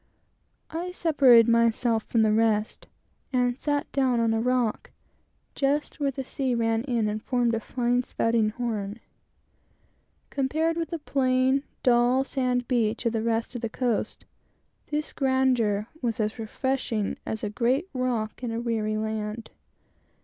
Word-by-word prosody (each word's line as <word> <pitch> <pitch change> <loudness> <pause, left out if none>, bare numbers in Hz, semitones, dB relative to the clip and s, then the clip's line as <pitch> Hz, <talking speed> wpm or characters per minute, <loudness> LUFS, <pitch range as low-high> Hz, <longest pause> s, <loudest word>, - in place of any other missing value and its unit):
I 340 +3 -3
separated 270 -10 +5
myself 230 0 +3
from 225 -2 +2
the 215 - +3
rest 215 -1 +1 0.4
and 245 -1 +1
sat 290 -1 -1
down 260 -3 +2
on 230 -1 +2
a 225 - +1
rock, 250 -2 0 0.6
just 285 +3 -1
where 285 -1 +1
the 270 0 -4
sea 260 -1 -2
ran 225 -1 +1
in 235 -5 0
and 210 +1 -2
formed 240 -1 +1
a 225 - 0
fine 245 +2 0
spouting 230 -3 +1
horn. 215 -2 -4 1.3
Compared 315 +4 0
with 330 -1 -2
the 335 - -3
plain, 260 -2 +1 0.2
dull 245 +1 +4
sand 250 -3 -1
beach 230 -2 0
of 230 - +1
the 225 - 0
rest 230 +1 -1
of 245 - -5
the 230 - -2
coast, 240 -1 -2 0.6
this 300 0 -3
grandeur 255 -6 +1 0.2
was 230 -3 -1
as 215 +2 -1
refreshing 225 -1 -2
as 220 - -5
a 210 - -1
great 255 - +1
rock 250 -4 -2
in 240 - -2
a 225 - -2
weary 220 -2 -1
land. 220 +1 -4
240 Hz, 150 wpm, -26 LUFS, 225-260 Hz, 1.3 s, separated